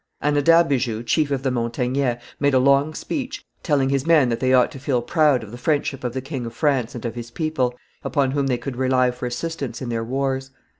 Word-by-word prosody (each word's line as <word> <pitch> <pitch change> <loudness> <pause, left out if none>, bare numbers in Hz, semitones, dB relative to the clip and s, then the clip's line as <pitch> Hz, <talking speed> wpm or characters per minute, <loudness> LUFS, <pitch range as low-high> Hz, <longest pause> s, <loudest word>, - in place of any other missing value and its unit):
Anadabijou, 145 -6 +2
chief 150 +3 +1
of 135 -2 -2
the 135 - +1
Montagnais, 125 +1 -1 0.2
made 140 -1 +2
a - - +6
long 140 +3 +3
speech, 270 -2 -4 0.2
telling 140 -5 +1
his 135 -1 +1
men 155 -7 +5
that 115 -1 -1
they 130 +1 +1
ought 125 -1 +4
to 135 - -9
feel 130 -3 0
proud 150 -4 +3
of 105 - -10
the 120 - -9
friendship 145 -1 -1
of 125 -1 -2
the 130 - -3
king 135 -1 -5
of 115 - -9
France 135 -5 0
and 120 - -7
of 115 - -2
his 120 0 -7
people, 130 -3 -1 0.3
upon 140 -3 +1
whom 140 0 0
they 125 -2 +1
could 125 +1 -6
rely 130 -1 +2
for 125 0 -5
assistance 140 +2 -4
in 125 - -5
their 115 -1 -2
wars. 135 +2 -2
130 Hz, 220 wpm, -22 LUFS, 125-145 Hz, 0.3 s, a